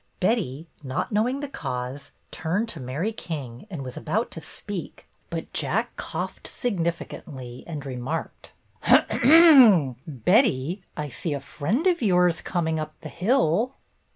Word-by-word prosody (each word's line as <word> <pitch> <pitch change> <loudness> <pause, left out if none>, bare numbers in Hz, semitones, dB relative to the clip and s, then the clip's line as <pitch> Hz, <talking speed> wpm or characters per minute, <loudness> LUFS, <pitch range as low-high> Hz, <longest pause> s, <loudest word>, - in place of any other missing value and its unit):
Betty, 180 - 0 0.2
not 145 - -3
knowing 240 +6 +1
the 290 - -3
cause, 125 - -5 0.2
turned 185 +8 -1
to 165 - -6
Mary 140 - -2
King 145 - -6
and 165 -8 -5
was 125 -1 -7
about 220 +5 -1
to 165 - -7
speak, 200 +2 -7 0.2
but - - -5
J - - -1
ack - - -1
coughed - - -5
significantly 165 - -4
and 150 -4 -6
remarked: 135 +4 -5 0.4
"Ahem! 245 - +7
Betty, 170 - +2 0.2
I 150 -1 -2
see 150 +5 -3
a - - -3
friend 185 - -2
of 355 -3 +3
yours 180 -5 +3
coming 160 -3 -1
up 155 0 -6
the 155 - -7
hill. 220 - +1
165 Hz, 140 wpm, -25 LUFS, 140-215 Hz, 0.4 s, Ahem